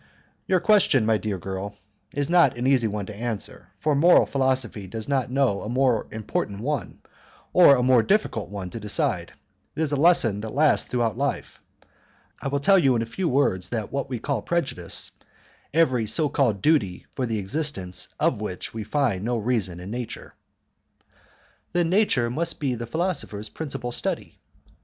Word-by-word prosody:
"Your 185 Hz, -1 st, +3 dB
question, 175 Hz, -, +4 dB
my 110 Hz, -1 st, +2 dB
dear 105 Hz, -3 st, -3 dB
girl, 95 Hz, +3 st, -5 dB, 0.4 s
is 145 Hz, -1 st, -1 dB
not 170 Hz, -8 st, +4 dB
an 120 Hz, -, -2 dB
easy 130 Hz, -4 st, +3 dB
one 105 Hz, -1 st, -3 dB
to 105 Hz, -, -8 dB
answer, 110 Hz, -5 st, -5 dB
for 155 Hz, 0 st, +1 dB
moral 165 Hz, +5 st, +6 dB
philosophy 130 Hz, -7 st, -1 dB
does 110 Hz, +3 st, -6 dB
not 135 Hz, -4 st, 0 dB
know 130 Hz, -6 st, +1 dB
a 105 Hz, -, -6 dB
more 125 Hz, -2 st, +1 dB
important 105 Hz, -2 st, -3 dB
one, 135 Hz, -4 st, -3 dB, 0.5 s
or 170 Hz, -6 st, +8 dB
a 125 Hz, -, 0 dB
more 125 Hz, -2 st, +5 dB
difficult 155 Hz, -, 0 dB
one 95 Hz, -3 st, -6 dB
to 115 Hz, -, -6 dB
decide; 105 Hz, -1 st, -1 dB, 0.4 s
it 155 Hz, -, -3 dB
is 150 Hz, -, -1 dB
a -, -, +1 dB
lesson 135 Hz, -, +4 dB
which 110 Hz, -, -5 dB
lasts 150 Hz, +2 st, +3 dB
throughout 120 Hz, -1 st, -1 dB
life. 140 Hz, 0 st, -3 dB, 0.8 s
I -, -, -3 dB
will 140 Hz, +1 st, 0 dB
tell 195 Hz, +7 st, +5 dB
you 135 Hz, -6 st, +3 dB
in 115 Hz, -, +1 dB
a -, -, -4 dB
few 170 Hz, +10 st, -2 dB
words 125 Hz, -9 st, +1 dB
that 110 Hz, -2 st, -4 dB
we 135 Hz, -2 st, -2 dB
call 135 Hz, 0 st, -2 dB
prejudice 135 Hz, -, -2 dB, 0.6 s
every 130 Hz, -8 st, +2 dB
so 155 Hz, +6 st, +1 dB
called 115 Hz, -9 st, 0 dB
duty 115 Hz, -, +1 dB
for 130 Hz, -2 st, -2 dB
the 115 Hz, -1 st, -1 dB
existence 100 Hz, -, -1 dB
of -, -, +1 dB
which -, -, -5 dB
we 110 Hz, -1 st, -4 dB
find 110 Hz, -5 st, 0 dB
no 120 Hz, +1 st, 0 dB
reason 105 Hz, -6 st, -1 dB
in 90 Hz, +3 st, -8 dB
nature." 120 Hz, -1 st, -6 dB, 1.4 s
"Then 175 Hz, -1 st, +1 dB
nature 160 Hz, -, +2 dB
must 165 Hz, +6 st, -2 dB
be 140 Hz, -4 st, 0 dB
the 120 Hz, 0 st, -5 dB
philosopher's 140 Hz, -, -3 dB
principal 135 Hz, -5 st, -5 dB
study?" -, -, -4 dB
125 Hz, 175 wpm, -24 LUFS, 105-145 Hz, 1.4 s, or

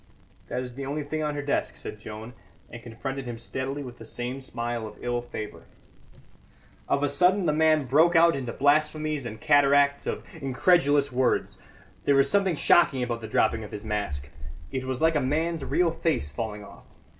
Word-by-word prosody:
"That 125 Hz, +1 st, -3 dB
is 125 Hz, -1 st, -8 dB
the 135 Hz, +1 st, -6 dB
only 150 Hz, +2 st, -2 dB
thing 155 Hz, +2 st, -3 dB
on 150 Hz, -1 st, -1 dB
her 145 Hz, -, -3 dB
desk," 140 Hz, -, -1 dB
said 105 Hz, -, -7 dB
Joan, 110 Hz, +2 st, -8 dB, 0.4 s
and 115 Hz, -, -9 dB
confronted 130 Hz, +3 st, -6 dB
him 120 Hz, -1 st, -5 dB
steadily 130 Hz, +4 st, -4 dB
with 125 Hz, -2 st, -10 dB
the -, -, -9 dB
same 125 Hz, +4 st, -5 dB
smile 120 Hz, -3 st, -4 dB
of 105 Hz, -, -12 dB
evil 120 Hz, 0 st, -2 dB
favour. 115 Hz, -3 st, -8 dB, 1.2 s
Of 140 Hz, -, +1 dB
a -, -, +3 dB
sudden 180 Hz, +6 st, +3 dB
the 155 Hz, -, +2 dB
man 155 Hz, -1 st, +3 dB
broke 160 Hz, +7 st, +4 dB
out 165 Hz, -1 st, +6 dB
into 130 Hz, -3 st, -4 dB
blasphemies 150 Hz, 0 st, +1 dB
and 110 Hz, -1 st, -8 dB
cataracts 140 Hz, +1 st, +4 dB
of -, -, -3 dB
incredulous 145 Hz, 0 st, +2 dB
words. 125 Hz, 0 st, 0 dB, 0.5 s
There 140 Hz, -, +4 dB
was 135 Hz, 0 st, +4 dB
something 195 Hz, -4 st, +2 dB
shocking 140 Hz, -4 st, +4 dB
about 120 Hz, -1 st, -3 dB
the 110 Hz, -, -6 dB
dropping 110 Hz, 0 st, +1 dB
of 105 Hz, -, -8 dB
his 105 Hz, +1 st, -7 dB
mask; 75 Hz, -10 st, -3 dB, 0.4 s
it 130 Hz, 0 st, -3 dB
was 130 Hz, 0 st, -3 dB
like 160 Hz, 0 st, +3 dB
a 150 Hz, -, +2 dB
man's 160 Hz, +4 st, -1 dB
real 175 Hz, +3 st, +2 dB
face 160 Hz, -, -1 dB
falling 105 Hz, +6 st, -5 dB
off. -, -, -14 dB
135 Hz, 190 wpm, -26 LUFS, 120-150 Hz, 1.2 s, out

